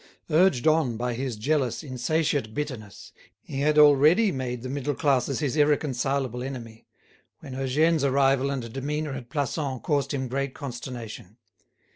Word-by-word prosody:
Urged 155 -5 +3
on 155 -7 +3
by 125 +1 -2
his 125 0 -3
jealous, 135 +4 0
insatiate 135 -3 -1
bitterness, 130 -9 -6 0.3
he 135 - -6
had 150 +1 +2
already 150 +8 +6
made 125 -4 -4
the - - -4
middle 140 +2 -2
classes 140 0 +1
his 140 -2 -1
irreconcilable 140 -4 +1
enemy, 120 -4 -7 0.5
when 130 - -9
Eugène's 145 +4 +1
arrival 135 0 +3
and 125 -5 -4
demeanour 150 +3 -3
at 130 -3 -7
Plassans 140 -2 -2
caused 145 -3 0
him 130 -3 -2
great 135 +1 -3
consternation. 120 - -7
135 Hz, 140 wpm, -26 LUFS, 125-150 Hz, 0.5 s, already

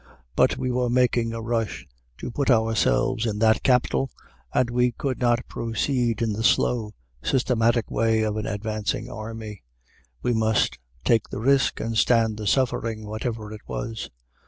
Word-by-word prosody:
But - - +3
we 125 - -1
were 125 0 0
making 120 -2 +2
a 115 0 -5
rush 115 -1 -2 0.3
to - - -6
put 140 +3 -1
ourselves 115 +1 +2
in 105 -1 -2
that 110 0 +3
capital, 130 +1 +2 0.4
and 125 - +2
we 125 0 +2
could 130 +1 -3
not 120 0 +1
proceed 115 0 -1
in 110 -2 0
the 110 +2 -3
slow, 110 -2 +2 0.3
systematic 120 - +1
way 110 0 +2
of 105 -1 -1
an 110 - -3
advancing 105 +2 -3
army. 110 -2 -7 0.6
We 120 - +1
must 110 -1 +1 0.3
take 115 -3 +2
the - - -5
risk 135 +3 +2
and 115 0 -3
stand 110 -1 +3
the 105 -1 -4
suffering, 115 -3 0
whatever 110 0 -4
it 105 - -9
was. 115 -1 -5
115 Hz, 155 wpm, -25 LUFS, 110-125 Hz, 0.6 s, But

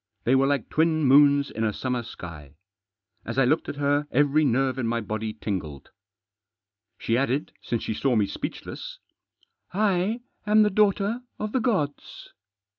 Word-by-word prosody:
They 125 - +2
were 135 +1 +4
like 140 -5 0
twin 160 0 +1
moons 140 +1 +5
in 110 - -3
a 110 - +1
summer 125 +3 -2
sky. 80 - -10 0.7
As 115 - -6
I 135 - +4
looked 155 +6 +1
at - - -4
her 145 +1 0
every 145 +3 +3
nerve 130 -1 +1
in 120 - -1
my 115 0 0
body 110 0 -4
tingled. 95 -10 -5 1.1
She 115 - -1
added, 135 +3 0
since 115 - -3
she - - -2
saw 130 +3 0
me 105 -2 +3
speechless: 100 - -6 0.4
" - - -37
I 205 +2 +1 0.3
am 215 +1 +6
the 210 - +2
daughter 210 +3 +2 0.2
of 215 0 -4
the 260 - +1
gods." 170 - -2
140 Hz, 165 wpm, -25 LUFS, 115-160 Hz, 1.1 s, am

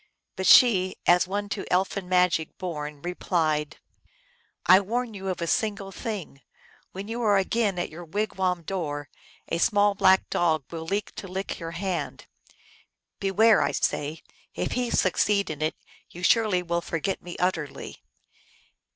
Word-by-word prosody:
But 190 - -2
she, 190 -7 +6
as 175 +1 +4
one 205 +2 -2
to 200 - -3
elfin 190 0 0
magic 180 -3 +2
born, 150 -5 -5
replied, 160 -4 -1 0.4
" - - -38
I - - +7
warn 230 +4 -2
you 195 -1 -7
of 180 -2 -2
a - - 0
single 200 +2 -1
thing. 195 - -6 0.5
When 195 +2 -7
you 235 +2 -3
again 200 0 +1
are 175 - 0
at - - -7
your 170 +3 -9
wigwam 185 -1 -1
door 145 -6 -4 0.4
a 165 - -1
small 205 0 +3
black 190 -1 +4
dog 160 -4 +1
will 165 -1 -5
leap 200 +5 -2
to 195 - -6
lick 190 +2 -4
your 165 -1 -6
hand. 180 -6 -3 0.9
Beware, 215 +3 +4
I - - 0
say; 150 +2 -2 0.3
if - - -2
he 250 -1 -1
succeed 200 -1 +2
in 155 -1 -7
it, 155 +1 0 0.3
you 175 - -10
surely 210 -3 +3
will 170 0 -1
forget 170 +3 -3
me 175 - -8
ut 180 +1 +2
terly." 150 -4 -7
185 Hz, 160 wpm, -26 LUFS, 165-200 Hz, 0.9 s, I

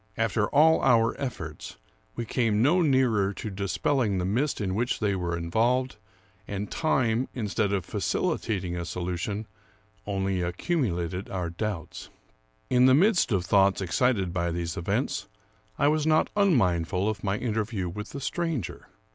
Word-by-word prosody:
After 110 -1 +1
all 160 +3 +5
our 115 -3 +3
efforts, 80 - -6 0.4
we 120 - -3
came 115 -3 +1
no 170 +7 +4
nearer 125 - +2
to 105 - -6
dispelling 100 +3 0
the 90 - -1
mist 125 +10 0
in 95 -3 -1
which 120 +5 -1
they 105 -2 +1
were 85 -2 -2
involved; 120 +10 0 0.5
and 100 0 -4
time, 130 -6 +1
instead 105 -3 -1
of 95 -4 -1
facilitating 90 -2 -1
a 85 - -3
solution, 90 +5 -3 0.6
only 95 -2 -1
accumulated 90 - -2
our 90 -3 -3
doubts. 95 -2 -5 0.6
In 125 0 +4
the 130 - +6
midst 185 - +3
of 95 -4 +1
thoughts 100 0 +3
excited 95 -1 +1
by 85 -1 0
these 85 -1 -3
events, 85 - -2 0.5
I 145 - +3
was 155 +1 +2
not 155 0 +3
unmindful 95 - +2
of 105 -2 -3
my 100 0 0
interview 110 -5 -2
with 105 +5 -6
the 140 - -7
stranger. 165 - -3
105 Hz, 145 wpm, -27 LUFS, 90-125 Hz, 0.6 s, the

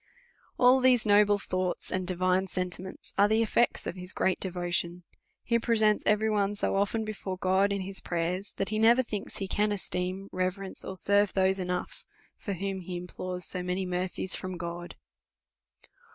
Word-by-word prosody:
All 250 +1 +6
these 255 -3 +4
noble 205 0 +5
thou<>hts 185 -2 -2
and 185 -1 -2
divine 185 +1 +1
sentiments 185 0 -5
arc 205 +1 +6
the 220 +1 +3
eOects 235 +2 +1
of - - -4
his 180 0 -4
great 190 - +1
devo 175 -2 -3
tion; 175 +1 0 0.4
he 235 -1 +2
presents 220 -2 +3
every 210 +1 +3
one 205 -1 +1
so 205 - 0
often 205 +3 0
before 195 -3 -5
God 190 +2 +2
in 200 -1 -1
his 190 +1 -4
prayers, 180 +3 -2
that 195 - -2
he 215 0 -1
never 235 +3 +5
thinks 210 -4 -5
he 195 - -3
can 210 +2 +1
esteem, 185 -1 -2
re 185 0 +1
verence, 195 +1 -4
or 190 - -6
serve 200 +1 +2
those 190 0 +2
enough, 180 -1 -3 0.3
for 200 - -5
whom 195 +1 -3
he 180 0 -5
implores 180 0 -6
£0 180 -1 -4
many 180 +1 -1
mercies 180 +1 -2
from 185 -1 -5
God. 175 0 -6
190 Hz, 180 wpm, -29 LUFS, 180-205 Hz, 0.4 s, All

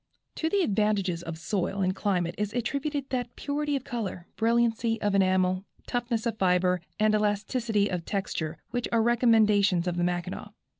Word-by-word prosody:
To 320 - 0
the 400 +1 +2
advantages 200 - +1
of 165 -2 -6
soil 190 +3 -2
and 185 0 +1
climate 180 -4 0
is 210 0 -3
attributed 280 +4 -2
that 245 -2 -2
purity 290 0 -1
of 270 - -2
color, 220 -9 -4
brilliancy 230 0 +1
of 205 -1 0
enamel, 185 -1 +2 0.2
toughness 240 -2 -2
of 225 -2 -2
fibre 180 -1 +2 0.2
and 215 0 +3
elasticity 210 +1 +1
of 180 -3 -3
texture 165 -5 -3
which 245 0 -1
are 230 -1 +3
recommendations 215 -6 +4
of 175 -1 -2
the 175 - +1
Mackinaw. 175 +1 -3
210 Hz, 160 wpm, -28 LUFS, 185-235 Hz, 0.2 s, recommendations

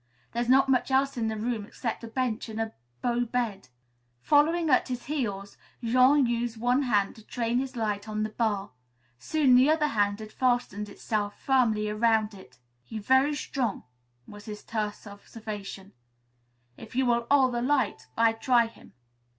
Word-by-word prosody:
"There's 240 +1 -2
not 270 +1 +5
much 260 -1 +2
else 270 +1 +2
in 230 -2 -1
the 220 0 -2
room, 225 0 -2
except 230 +3 -5
a - - -6
bench 235 -1 -2
and 220 0 -5
a 225 0 -2 0.3
bough 245 0 +1
bed." 230 - -2 0.6
Following 320 +3 +3
at 255 - +4
his 250 -2 -5
heels, 205 -9 -3 0.3
Jean 255 +4 +5
used 235 -1 -2
one 245 +4 +2
hand 210 -7 +1
to 220 - -14
train 235 +2 -1
his 265 0 -4
light 210 -2 -2
on 215 0 -2
the 215 - -3
bar. 210 - -1 0.5
Soon 280 - +2
the 255 +3 +6
other 310 -1 +2
hand 205 -4 +1
had 215 0 -9
fastened 240 -5 0
itself 205 0 -3
firmly 230 -6 +2
around 215 0 +1
it. 185 -11 -15 0.3
"He 220 - -8
very 260 +7 +3
strong," 255 -5 -2 0.4
was 205 0 -12
his 210 -2 -8
terse 215 -2 -4
observation. 205 -1 -8 0.8
"If 225 +2 -12
you 260 0 +2
will 235 -1 +1
'old 265 -3 +4
the 240 - -1
light, 275 +2 0
I 230 0 +4
try 235 +1 +3
him." 225 - -14
230 Hz, 170 wpm, -27 LUFS, 215-255 Hz, 0.8 s, the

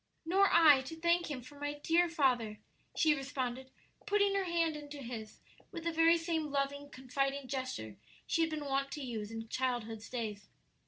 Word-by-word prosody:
"Nor 390 +4 +4
I 300 -5 +7
to 325 - -6
thank 340 +1 +1
Him 260 -4 -5
for 285 +3 -13
my 290 0 -2
dear 335 +4 +2
father," 250 -9 +1 0.4
she 315 -2 +4
responded, 265 -2 -3 0.4
putting 405 -1 +3
her 395 -1 +1
hand 335 -2 +1
into 295 -1 -8
his, 235 -5 -7 0.3
with 335 -4 -6
the 335 - 0
very 330 +1 +5
same 325 -2 -1
loving, 285 0 -2
confiding 275 +1 -2
gesture 255 - -4 0.3
she 330 - +1
had 325 - +2
been 305 -2 -4
wont 275 0 0
to 295 - -5
use 220 -5 -4
in 225 0 -6
childhood's 230 -3 -2
days. 215 -5 -5
285 Hz, 175 wpm, -33 LUFS, 250-330 Hz, 0.4 s, I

